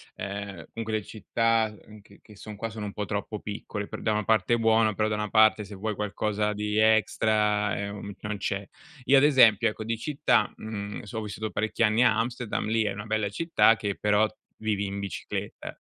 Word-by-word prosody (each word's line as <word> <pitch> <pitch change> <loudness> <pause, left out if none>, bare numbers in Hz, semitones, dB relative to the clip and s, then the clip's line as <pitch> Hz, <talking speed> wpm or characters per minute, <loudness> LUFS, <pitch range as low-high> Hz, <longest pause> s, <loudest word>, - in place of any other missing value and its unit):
ehm, 100 -3 -6
comunque 110 -1 -5
le 110 -1 0
città, 115 +1 0
uhm, 105 -1 -13
che 100 - -19
che 105 - -16
son 105 +1 -9
qua, 115 +3 -4
sono 110 -2 -6
un 100 - -6
po' 105 - -3
troppo 105 +1 -4
piccole. 105 0 -5
Per - - -7
da 110 - +1
una 105 0 0
parte 110 0 +2
è - - 0
buono, 110 -1 +3
però 110 +1 0
da 105 - 0
una 105 0 -3
parte 110 0 +5
se 100 +1 -10
vuoi 105 +2 -3
qualcosa 105 0 -1
di 105 0 -2
extra, 105 -1 +2
uhm, 100 0 -7
non 105 0 -3
c'è. 100 +1 -3 0.4
Io 140 - +6
ad 135 - +5
esempio, 125 -8 +6
ecco 110 - -6
di 115 +1 -1
città, 140 -4 +1
mhmm, 105 -2 -6
so 105 +1 -7
ho - - -4
vissuto 110 +1 -5
parecchi 110 +3 -2
anni 110 +2 +4
a 110 -4 +4
Amsterdam, 120 0 -2
lì 110 +1 +1
è 105 - -1
una 100 +1 -7
bella 110 -2 0
città 160 - +3
che 100 -2 -3
però 105 +1 +3 0.3
vivi 105 -2 -1
in 100 0 -4
bicicletta. 100 -4 -6
105 Hz, 210 wpm, -27 LUFS, 105-110 Hz, 0.4 s, Io